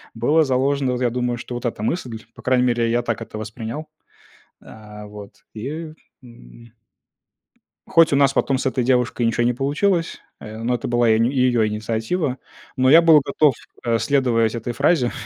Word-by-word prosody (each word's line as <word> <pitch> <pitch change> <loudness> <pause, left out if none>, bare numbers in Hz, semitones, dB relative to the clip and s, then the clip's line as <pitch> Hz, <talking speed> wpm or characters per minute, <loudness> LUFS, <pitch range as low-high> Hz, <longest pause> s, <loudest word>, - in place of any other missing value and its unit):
было 150 +8 +2
заложено, 135 0 0
вот 125 - -4
я 120 - +2
думаю, 125 0 -2
что 120 - -8
вот 120 - -6
эта 110 -2 -3
мысль. 120 -4 -3 0.2
По - - -13
крайней 125 -1 +2
мере, 120 -1 +1
я 120 +1 +1
так 115 -3 -3
это 110 - -8
воспринял. 115 +7 -6 0.7
А, 105 -1 -12
вот, 105 -1 -13
и, 155 +8 -6 0.3
м 115 - -16 1.2
хоть 165 -3 +4
у - - +4
нас 140 -1 +3
потом 135 -1 +1
с 135 - -5
этой 130 -1 0
девушкой 125 -1 +1
ничё 115 +1 +1
не 120 +1 +2
получилось, 165 - -1 0.2
э, 110 +1 -9
но 120 +2 -1
это 120 - -5
была 120 -1 +2
и - - +5
её 125 -2 +2
инициатива, 115 +7 -2 0.4
но 130 0 +3
я 165 +3 +8
был 160 -3 +6
готов, 140 -1 +2 0.3
э, 115 -1 +1
следовать 120 -5 +1
этой 120 +1 -4
фразе 140 -2 +1
125 Hz, 175 wpm, -21 LUFS, 115-140 Hz, 1.2 s, я